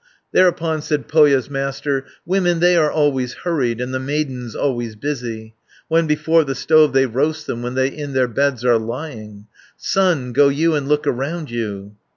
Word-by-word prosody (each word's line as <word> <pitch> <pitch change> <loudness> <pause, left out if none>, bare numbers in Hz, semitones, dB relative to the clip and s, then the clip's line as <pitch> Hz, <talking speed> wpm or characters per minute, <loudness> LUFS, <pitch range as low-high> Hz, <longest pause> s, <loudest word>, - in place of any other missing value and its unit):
510 - - +5
Thereupon 165 -3 +1
said 150 -1 -2
Pohja's 145 -4 +4
Master: 135 0 -2 0.2
"Women 175 -2 +1
they 175 +1 +4
are 155 -3 +3
always 135 -5 0
hurried, 130 -10 -1
And 125 +1 -4
the 130 - -1
maidens 130 -4 -3
always 120 -5 -2
busy, 115 -4 -5 0.4
When 165 0 +2
before 155 +2 +2
the 135 -2 -4
stove 155 -2 +4
they 135 0 +4
roast 150 +6 -1
them, 120 - -4
When 125 +1 -4
they 130 0 +2
in 145 0 -7
their 130 -1 +2
beds 130 0 -1
are 120 -2 +4
lying; 110 -4 -7 0.3
Son, 170 -11 0
go 140 +3 +5
you, 160 +4 +1
and 145 -2 -1
look 150 0 +1
around 145 +4 -3
you." 105 -3 -5
140 Hz, 180 wpm, -19 LUFS, 125-155 Hz, 0.4 s, 510